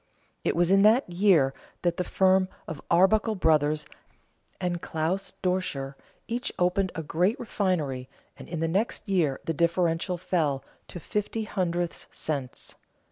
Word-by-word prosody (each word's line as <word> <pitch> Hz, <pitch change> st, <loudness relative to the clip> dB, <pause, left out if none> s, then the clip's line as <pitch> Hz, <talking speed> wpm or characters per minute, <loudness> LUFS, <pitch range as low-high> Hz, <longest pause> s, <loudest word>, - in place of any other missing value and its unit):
It -, -, +1 dB
was 175 Hz, +1 st, +3 dB
in 195 Hz, 0 st, +6 dB
that 220 Hz, +6 st, +5 dB
year 175 Hz, -7 st, +3 dB, 0.3 s
that 175 Hz, -1 st, +1 dB
the 180 Hz, -, 0 dB
firm 190 Hz, 0 st, +3 dB, 0.2 s
of 160 Hz, -, -6 dB
Arbuckle 215 Hz, +5 st, +4 dB
Brothers 155 Hz, -4 st, +2 dB, 0.7 s
and 175 Hz, -2 st, -2 dB
Claus 180 Hz, +4 st, -2 dB
Doscher 180 Hz, -7 st, -1 dB, 0.3 s
each 240 Hz, +2 st, -2 dB
opened 180 Hz, +1 st, +1 dB
a 160 Hz, -, -3 dB
great 180 Hz, +8 st, +1 dB
refinery, 165 Hz, -, -1 dB, 0.3 s
and -, -, -12 dB
in 170 Hz, -2 st, -3 dB
the 165 Hz, -, +1 dB
next 200 Hz, +7 st, -1 dB
year 170 Hz, -9 st, +1 dB
the 165 Hz, -, 0 dB
differential 170 Hz, +2 st, +1 dB
fell 155 Hz, -6 st, 0 dB, 0.2 s
to 175 Hz, -, -8 dB
fifty 210 Hz, +6 st, -2 dB
hundredths 175 Hz, -4 st, -2 dB
cents. 140 Hz, -5 st, -5 dB
175 Hz, 140 wpm, -27 LUFS, 160-190 Hz, 0.7 s, in